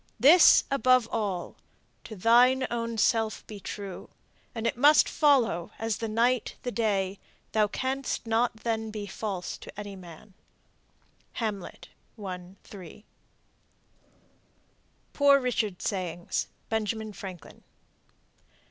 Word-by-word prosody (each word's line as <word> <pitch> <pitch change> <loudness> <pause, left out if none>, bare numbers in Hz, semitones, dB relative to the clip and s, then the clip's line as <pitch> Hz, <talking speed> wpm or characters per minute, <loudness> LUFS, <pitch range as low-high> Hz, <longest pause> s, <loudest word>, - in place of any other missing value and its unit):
This 315 +7 +7
above 255 -3 +3
all: 200 -6 -3 0.5
to 220 - -8
thine 245 +6 +4
own 230 -1 -3
self 220 0 +1
be 210 -2 -9
true, 200 -1 -7 0.5
And 225 0 -4
it 230 - 0
must 290 +5 +5
follow, 250 - +2
as 225 -2 -2
the 225 - -3
night 235 +3 +1
the 245 - -3
day, 200 -4 -1 0.3
Thou 215 -1 +2
canst 260 +5 -3
not 225 0 0
then 225 -1 -2
be 215 -1 -6
false 200 -3 -5
to - - -11
any 205 -1 -7
man. 185 +2 -13 1.0
"Hamlet," 210 -5 -5 0.3
1 185 -3 -8
:3. 195 +1 -12 2.1
POOR 280 -1 +5
RICHARD'S 225 -7 -2
SAYINGS. 175 -4 -3 0.2
(Benjamin 220 0 -2
Franklin.) 185 -5 -10
220 Hz, 110 wpm, -27 LUFS, 195-240 Hz, 2.1 s, This